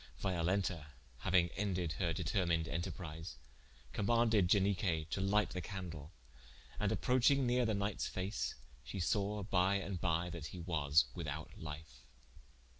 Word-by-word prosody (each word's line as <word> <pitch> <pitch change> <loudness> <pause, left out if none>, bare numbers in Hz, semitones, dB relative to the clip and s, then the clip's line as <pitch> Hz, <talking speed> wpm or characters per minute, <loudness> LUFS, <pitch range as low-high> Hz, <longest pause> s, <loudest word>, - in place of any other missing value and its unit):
Violenta 90 -3 0 0.4
hauing 85 -1 +4
ended 90 -5 -1
her 90 -3 +1
determined 85 0 +1
enterprise, 85 -2 -5 0.6
commaunded 110 - +3
Ianique 90 -5 +2
to 95 - -1
light 105 +1 +2
the 90 - -3
candle, 85 -4 -6 0.7
and - - +1
approching 130 +2 +3
nere 125 0 +3
the 110 - +1
knightes 100 0 -1
face, 95 +3 -2 0.3
shee 100 - -6
sawe 100 +4 0
by 95 0 +2
and 95 -2 -3
by 85 0 +1
that 80 -3 -5
he 90 - -8
was 80 -3 +3
without 80 -3 -5
life. 75 0 -8
90 Hz, 130 wpm, -36 LUFS, 80-100 Hz, 0.7 s, hauing